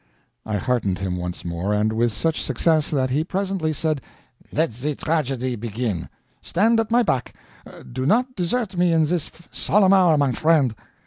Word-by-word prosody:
I 110 - -1
heartened 115 -6 0
him 95 -2 -3
once 90 -1 -5
more, 85 +4 -1
and 105 +1 +1
with 115 +1 +1
such 160 +8 -1
success 155 -3 +1
that 130 -4 0
he 145 +4 +1
presently 190 -2 -2
said, 155 -1 -1 0.5
"Let 160 -3 +1
the 135 +6 -3
tragedy 135 -6 -1
begin. 110 -4 -3 0.3
Stand 225 +6 +2
at 225 - -1
my 240 +1 +4
back; 130 - -1 0.6
do 130 +2 -2
not 250 - +2
desert 195 +2 -1
me 175 0 +3
in 160 -1 +4
this 165 -1 -1 0.2
solemn 195 -1 +3
hour, 180 -5 +5
my 140 -2 +2
friend." 150 -4 +2
150 Hz, 170 wpm, -22 LUFS, 120-175 Hz, 0.6 s, hour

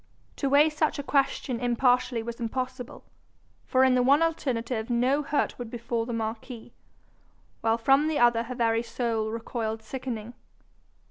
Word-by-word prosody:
To 275 - 0
weigh 295 +3 +5
such 310 0 0
a 285 - -4
question 275 -3 0
impartially 245 0 +1
was 235 0 -6
impossible; 255 +1 -4 0.6
for 260 0 +3
in 260 -1 +5
the 250 - +3
one 280 +5 +4
alternative 245 -8 -2
no 250 +4 +2
hurt 290 -2 -1
would 240 -2 -5
befall 235 -1 -3
the - - -4
marquis, 225 +1 -5 0.9
while 225 0 +2
from 270 +6 +3
the 315 -2 0
other 240 -1 +4
her 255 +2 -6
very 230 -2 +1
soul 230 -2 -2
recoiled 225 -1 -4
sickening. 240 -1 -6
245 Hz, 150 wpm, -27 LUFS, 230-265 Hz, 0.9 s, weigh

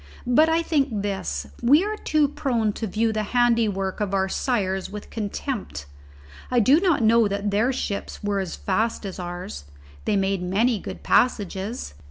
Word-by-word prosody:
But 300 +6 +4
I 330 +1 +2
think 275 -11 0
this: 135 - -3 0.2
we 290 +8 +5
are 425 +1 -2
too 305 -7 +1
prone 235 -7 -1
to 220 - -4
view 220 +3 0
the 215 - 0 0.2
handiwork 220 -6 +2
of 200 -1 0
our 190 0 +1
sires 195 -4 -1
with 205 0 -9
contempt. 205 - -4 0.6
I 250 - +3
do 265 +8 +5
not 345 -9 +2
know 230 +1 +5
but 215 - +2
that 200 +1 -2
their 220 +6 +2
ships 205 -7 -4
were 205 -1 0
as 190 -3 -3
fast 220 +3 -1
as 190 -2 -6
ours. 175 - -6 0.4
They - - +1
made 195 -1 0
many 210 +6 +1
good - - -8
passages. 205 - 0
210 Hz, 175 wpm, -24 LUFS, 195-245 Hz, 0.6 s, we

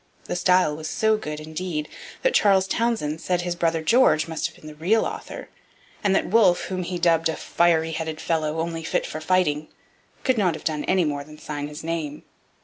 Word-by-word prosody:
The - - -4
style 180 -3 +3
was 155 0 -6
so 220 0 +2
good, 150 -8 -5
indeed, 155 0 -4 0.4
that - - +3
Charles 195 -2 +4
Townshend 190 -8 -1
said 180 -1 0
his 175 0 -2
brother 165 -2 0
George 200 -7 +4
must 160 -1 -2
have - - -15
been - - -17
the 155 - -8
real 185 +9 +2
author, - - -6 0.5
and 195 -2 +3
that - - +2
Wolfe, 200 -4 +4
whom 185 -1 -2
he 180 0 -3
dubbed 165 -2 +3
'a 160 - -1
fiery 165 -1 +2
headed 160 -1 -4
fellow, 160 -1 -1
only 165 0 -4
fit 160 - -1
for 155 - -6
fighting,' 155 -3 +1 0.6
could 260 -4 +2
not 180 -5 +2
have - - -9
done 155 -2 -1
any 185 -2 +2
more 145 -1 -2
than 150 +1 -13
sign 145 -1 -5
his 150 +2 -9
name. 160 -3 -4
165 Hz, 205 wpm, -24 LUFS, 155-185 Hz, 0.6 s, Charles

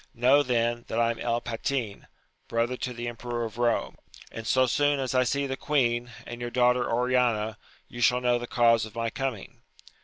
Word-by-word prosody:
Know, 130 +4 +5
then, 120 -3 0
that 115 - -2
I 115 0 +3
am 115 - -7
El 120 0 -1
Patin, 115 -2 -3 0.4
brother 115 +2 0
to 125 - -4
the 120 0 -5
emperor 120 0 -4
of 110 - -7
Kome, 120 +1 0 0.3
and 115 0 -7
so 130 0 +4
soon 145 +3 +1
as 130 -1 -2
I 130 0 +4
see 140 +3 0
the 135 -1 -3
queen, 120 -4 0 0.2
and 120 0 -8
your 120 - -3
daughter 125 0 +2
Oriana, 120 -3 +1 0.3
you 120 - -8
shall 125 +1 +4
know 125 -1 +1
the 120 - -6
cause 115 -2 +3
of 110 0 -8
my 115 -1 -2
coming. 130 -7 -5
120 Hz, 195 wpm, -27 LUFS, 115-125 Hz, 0.4 s, Know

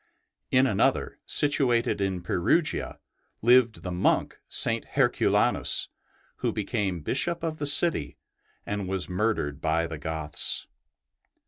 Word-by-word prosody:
In 130 +1 +4
another, 110 -7 0
situated 125 -7 +2
in 95 -2 -2
Perugia, 150 - 0 0.5
lived 120 -1 +4
the 90 - -5
monk 90 +1 0
St. - - +2
Herculanus, - - +1 0.5
who - - -1
became 95 -5 -3
Bishop 170 - -1
of 160 -1 -3
the 145 - -1
city 145 - +2 0.5
and 100 -2 -4
was 95 -1 -1
murdered 90 -7 -2
by 80 +1 0
the 80 -2 -7
Goths. 80 0 -1
100 Hz, 115 wpm, -26 LUFS, 85-130 Hz, 0.5 s, In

